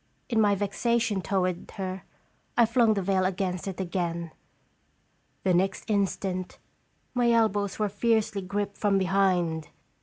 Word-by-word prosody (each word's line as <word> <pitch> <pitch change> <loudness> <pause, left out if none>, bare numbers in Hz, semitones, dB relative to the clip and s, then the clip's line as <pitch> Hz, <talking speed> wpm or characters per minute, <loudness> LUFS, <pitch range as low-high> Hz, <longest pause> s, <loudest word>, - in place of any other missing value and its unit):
In 225 -3 +3
my 205 -1 +4
vexa 205 +4 0
tion 215 -4 0
toward 185 -2 -1
her, 190 -1 -4 0.6
I 235 - +7
flung 230 -1 +3
the 195 - -1
veil 190 0 +2
against 185 -1 -1
it 190 -1 -5
again. 170 -2 -2 1.1
The 185 - +3
next 190 +2 +1
instant, 190 -2 -1 0.6
my 245 -1 +3
elbows 205 -3 +2
were 215 - +1
fiercely 210 0 +1
gripped 200 +2 -3
from 205 -2 +2
behind. 185 -4 +1
195 Hz, 140 wpm, -27 LUFS, 185-210 Hz, 1.1 s, I